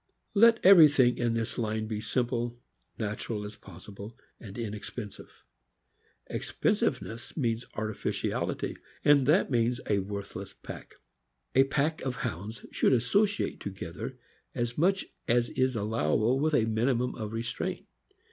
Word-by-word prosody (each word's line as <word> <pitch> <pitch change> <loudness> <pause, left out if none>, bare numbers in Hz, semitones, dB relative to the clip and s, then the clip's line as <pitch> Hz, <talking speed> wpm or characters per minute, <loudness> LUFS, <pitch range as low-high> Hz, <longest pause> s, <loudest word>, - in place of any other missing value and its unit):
Let 230 +1 +5
everything 150 -10 +7
in 120 -1 +1
this 115 +1 -2
line 110 -1 -1
be 110 -1 -3
simple, 120 +1 -1 0.4
natural 105 0 -3
as 105 +1 -8
possible, 100 +4 -11 0.2
and 100 -2 -10
inexpensive. 105 -1 -7 0.8
Expensive - - 0
ness 115 +7 -9
means 115 -4 0
artificiality, 110 0 -2 0.3
and 140 -3 +5
that 155 0 +4
means 120 0 +2
a 105 -1 +2
worthless 100 0 -6
pack. - - -10 0.6
A 135 +1 +6
pack 150 +3 0
of 130 -2 -2
Hounds 105 +8 -5
should - - +3
associate 200 - +1
together 100 +6 -6 0.4
as 120 -1 -2
much 190 +5 +2 0.2
as 120 0 +2
is 130 -1 +1
allowable 110 - +1
with 155 +1 +2
a 110 - +3
minimum 120 +3 +1
of 110 -3 -5
restraint. 115 +1 -3
115 Hz, 130 wpm, -29 LUFS, 105-130 Hz, 0.8 s, everything